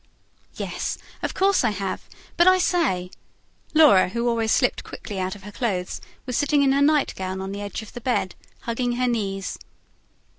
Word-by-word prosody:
"Yes, -, -, -3 dB, 0.2 s
of -, -, -3 dB
course 390 Hz, -3 st, +3 dB
I 235 Hz, -, +3 dB
have. 195 Hz, -2 st, -4 dB, 0.3 s
But 345 Hz, -, +5 dB
I 370 Hz, 0 st, +7 dB
say" 300 Hz, -, +1 dB, 0.6 s
Laura, 290 Hz, -14 st, +7 dB
who 235 Hz, +4 st, -1 dB
always 230 Hz, -2 st, +1 dB
slipped -, -, +2 dB
quickly 200 Hz, -2 st, -7 dB
out 185 Hz, +1 st, -2 dB
of 200 Hz, -, -14 dB
her 205 Hz, -, -9 dB
clothes, 200 Hz, -6 st, -2 dB, 0.2 s
was 250 Hz, -2 st, -3 dB
sitting 290 Hz, +1 st, +3 dB
in 270 Hz, -, +4 dB
her 280 Hz, +1 st, +3 dB
nightgown 230 Hz, -11 st, +1 dB
on 190 Hz, 0 st, -4 dB
the 200 Hz, +1 st, -5 dB
edge 205 Hz, +2 st, -5 dB
of 215 Hz, -, -13 dB
the 245 Hz, -, -7 dB
bed, 230 Hz, -7 st, 0 dB, 0.3 s
hugging 240 Hz, +1 st, -1 dB
her 250 Hz, +1 st, 0 dB
knees. 195 Hz, -5 st, -2 dB
230 Hz, 180 wpm, -24 LUFS, 195-275 Hz, 0.6 s, I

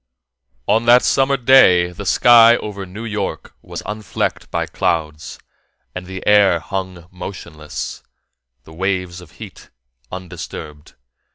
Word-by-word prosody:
On 110 Hz, +3 st, +2 dB
that 120 Hz, +1 st, +6 dB
summer 135 Hz, +1 st, +2 dB
day 115 Hz, -9 st, +5 dB
the 95 Hz, +2 st, -8 dB
sky 115 Hz, +4 st, +6 dB
over 100 Hz, -2 st, -7 dB
New 105 Hz, +5 st, -8 dB
York 105 Hz, -3 st, -5 dB
was -, -, -8 dB
unflecked 105 Hz, -1 st, -4 dB
by -, -, -2 dB
clouds, 80 Hz, -2 st, -3 dB, 0.6 s
and 90 Hz, 0 st, -7 dB
the 95 Hz, 0 st, -8 dB
air 105 Hz, -4 st, +4 dB
hung 95 Hz, -1 st, -6 dB
motionless, 85 Hz, -4 st, -8 dB, 0.6 s
the 80 Hz, -, -15 dB
waves 90 Hz, 0 st, -3 dB
of 85 Hz, -, -16 dB
heat -, -, -12 dB, 0.4 s
undisturbed. 85 Hz, -5 st, -9 dB
95 Hz, 120 wpm, -18 LUFS, 85-105 Hz, 0.6 s, that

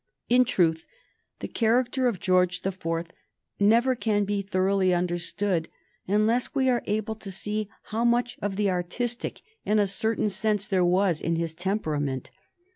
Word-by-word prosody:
In 250 Hz, +1 st, +5 dB
truth, 165 Hz, -8 st, +1 dB, 0.5 s
the -, -, -3 dB
character 245 Hz, +3 st, +1 dB
of 220 Hz, -7 st, -1 dB
George 180 Hz, 0 st, +2 dB
the 195 Hz, -, 0 dB
Fourth 165 Hz, -2 st, -3 dB, 0.5 s
never 235 Hz, +5 st, +4 dB
can 210 Hz, -3 st, 0 dB
be 200 Hz, 0 st, -1 dB
thoroughly 190 Hz, -1 st, +1 dB
understood 175 Hz, 0 st, -1 dB, 0.4 s
unless 215 Hz, +7 st, +1 dB
we 265 Hz, -1 st, +3 dB
are 245 Hz, -1 st, +2 dB
able 215 Hz, +1 st, -1 dB
to 220 Hz, -2 st, -9 dB
see 210 Hz, +2 st, -3 dB
how 225 Hz, +2 st, -2 dB
much 240 Hz, +1 st, +2 dB
of 205 Hz, -1 st, -2 dB
the 205 Hz, -1 st, +1 dB
artistic, 225 Hz, +7 st, -3 dB, 0.2 s
in 215 Hz, -, +1 dB
a 205 Hz, -, +4 dB
certain 215 Hz, +1 st, -1 dB
sense, 210 Hz, 0 st, 0 dB
there 190 Hz, -3 st, +1 dB
was 180 Hz, -1 st, +2 dB
in 165 Hz, -, 0 dB
his 165 Hz, -1 st, -2 dB
temperament. 155 Hz, -8 st, -2 dB
200 Hz, 155 wpm, -26 LUFS, 180-225 Hz, 0.5 s, In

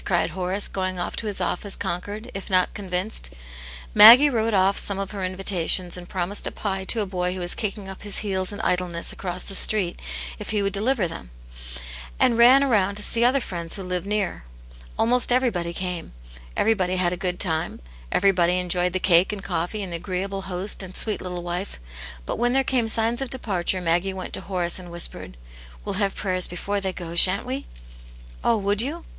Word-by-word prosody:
cried 175 Hz, -2 st, 0 dB
Horace, 185 Hz, +3 st, -2 dB
going 185 Hz, -1 st, -3 dB
off 175 Hz, -, -4 dB
to 220 Hz, -, -2 dB
his 205 Hz, -2 st, -1 dB
office 190 Hz, +2 st, -1 dB
conquered, 205 Hz, +7 st, -5 dB
if 195 Hz, -, -7 dB
not 185 Hz, -1 st, +2 dB
Convinced. 185 Hz, -, -1 dB, 0.6 s
Maggie 235 Hz, +8 st, +10 dB
wrote 225 Hz, -2 st, 0 dB
off 190 Hz, +1 st, +3 dB
some 200 Hz, -, -2 dB
of 195 Hz, -1 st, -4 dB
her 200 Hz, -2 st, -5 dB
invitations, 185 Hz, -1 st, +1 dB
and 175 Hz, -1 st, -9 dB
promised 190 Hz, +2 st, -1 dB
a -, -, -3 dB
pie 195 Hz, -2 st, -4 dB
to 225 Hz, +3 st, 0 dB
a -, -, -1 dB
boy 180 Hz, -1 st, -2 dB
who -, -, -6 dB
was 175 Hz, 0 st, +1 dB
kicking 205 Hz, -2 st, -4 dB
up 190 Hz, -1 st, -9 dB
his 205 Hz, -1 st, +2 dB
heels 190 Hz, -1 st, 0 dB
in 205 Hz, -, -7 dB
idleness 180 Hz, -2 st, -1 dB
across 180 Hz, -1 st, -4 dB
the 195 Hz, -, -5 dB
street 195 Hz, -3 st, +4 dB, 0.4 s
if -, -, -8 dB
he 210 Hz, -2 st, 0 dB
would 200 Hz, -1 st, -1 dB
deliver 210 Hz, -1 st, 0 dB
them; 165 Hz, -, -9 dB, 0.9 s
and 235 Hz, -, +3 dB
ran 265 Hz, +4 st, +7 dB
round 200 Hz, -4 st, +1 dB
to 210 Hz, -, -2 dB
see 230 Hz, +2 st, +3 dB
other 255 Hz, +3 st, +4 dB
friends 170 Hz, -8 st, -3 dB
who 195 Hz, -, -5 dB
lived 180 Hz, +1 st, -3 dB
near. 205 Hz, -, -2 dB, 0.5 s
Almost 245 Hz, +2 st, +2 dB
everybody 230 Hz, -10 st, +1 dB
came; 180 Hz, -, -5 dB, 0.4 s
everybody 190 Hz, -5 st, +1 dB
had 180 Hz, -1 st, +1 dB
a -, -, -2 dB
good 180 Hz, -1 st, -3 dB
time; 160 Hz, -4 st, -2 dB, 0.3 s
everybody 180 Hz, -2 st, +2 dB
enjoyed 180 Hz, 0 st, 0 dB
the 185 Hz, -, 0 dB
cake 180 Hz, +1 st, +4 dB
and 205 Hz, -2 st, -6 dB
coffee 180 Hz, +4 st, -3 dB
and 185 Hz, -, -6 dB
the 170 Hz, -, -3 dB
agreeable 190 Hz, +2 st, -4 dB
host. 185 Hz, +3 st, -3 dB
aod 185 Hz, 0 st, -9 dB
sweet 215 Hz, -2 st, +1 dB
little 180 Hz, -1 st, -6 dB
wife... 175 Hz, +3 st, -5 dB, 0.5 s
But -, -, -4 dB
when 240 Hz, +1 st, +1 dB
there 270 Hz, 0 st, +3 dB
came 250 Hz, -4 st, 0 dB
signs 230 Hz, +3 st, +1 dB
of 270 Hz, -, -3 dB
departure, 190 Hz, -7 st, -1 dB
Maggie 175 Hz, +3 st, 0 dB
went 185 Hz, -, -7 dB
to. -, -, -2 dB
Horace 180 Hz, -2 st, -1 dB
and 180 Hz, -1 st, -10 dB
whispered: 170 Hz, -, -5 dB, 0.2 s
" -, -, -19 dB
We'll 195 Hz, -, -3 dB
have 195 Hz, -1 st, 0 dB
prayers 185 Hz, -2 st, 0 dB
before 200 Hz, +3 st, -3 dB
they 190 Hz, -1 st, -2 dB
go, 170 Hz, -2 st, -8 dB
sha'n't 185 Hz, +5 st, +6 dB
wc?" 265 Hz, +2 st, -4 dB, 0.4 s
" -, -, -20 dB
Oh, 230 Hz, -, +3 dB
would 205 Hz, +1 st, 0 dB
you 305 Hz, +7 st, -5 dB
190 Hz, 205 wpm, -23 LUFS, 180-210 Hz, 0.9 s, Maggie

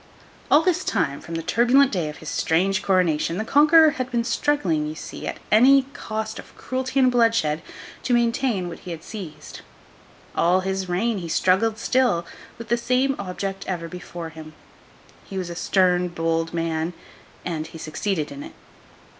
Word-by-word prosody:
All 300 Hz, +2 st, +6 dB
this 360 Hz, -1 st, +1 dB
time, 140 Hz, -9 st, -1 dB
from 165 Hz, -, -7 dB
the 165 Hz, -, -3 dB
turbulent 250 Hz, -, +4 dB
day 175 Hz, -6 st, -1 dB
of 150 Hz, -, -9 dB
his 160 Hz, -, -8 dB
strange 190 Hz, +5 st, +1 dB
coronation, 175 Hz, -3 st, +1 dB
the 215 Hz, -, -2 dB
Conqueror 305 Hz, +4 st, +6 dB
had 255 Hz, -2 st, -4 dB
been 240 Hz, -2 st, 0 dB
struggling, 200 Hz, -, 0 dB
you 155 Hz, -, -5 dB
see, -, -, -7 dB
at -, -, -4 dB
any 265 Hz, +5 st, +6 dB
cost 220 Hz, 0 st, -5 dB
of -, -, -13 dB
cruelty 260 Hz, +1 st, -2 dB
and 255 Hz, -1 st, +5 dB
bloodshed, 225 Hz, -11 st, +2 dB, 0.4 s
to 250 Hz, -, -1 dB
maintain 235 Hz, -5 st, +1 dB
what 170 Hz, -, -8 dB
he -, -, -10 dB
had 165 Hz, -2 st, -6 dB
seized. 190 Hz, -8 st, -9 dB, 0.7 s
All 180 Hz, +2 st, +3 dB
his 190 Hz, 0 st, -3 dB
reign, 205 Hz, +4 st, 0 dB
he 170 Hz, -2 st, -6 dB
struggled 195 Hz, +7 st, +2 dB
still, 235 Hz, -8 st, +1 dB, 0.3 s
with 230 Hz, -, -9 dB
the 235 Hz, -, +3 dB
same 255 Hz, +3 st, +1 dB
object 195 Hz, 0 st, -4 dB
ever 170 Hz, -3 st, -3 dB
before 175 Hz, -1 st, -7 dB
him. 160 Hz, -1 st, -11 dB, 0.7 s
He 195 Hz, -, -8 dB
was 180 Hz, -2 st, -3 dB
a -, -, -6 dB
stern, 180 Hz, 0 st, +2 dB
bold 165 Hz, -1 st, -1 dB
man, 165 Hz, 0 st, -2 dB, 0.5 s
and 160 Hz, -3 st, -3 dB
he 165 Hz, -, -11 dB
succeeded 160 Hz, +1 st, -3 dB
in 140 Hz, 0 st, -8 dB
it. -, -, -9 dB
190 Hz, 170 wpm, -23 LUFS, 165-235 Hz, 0.7 s, All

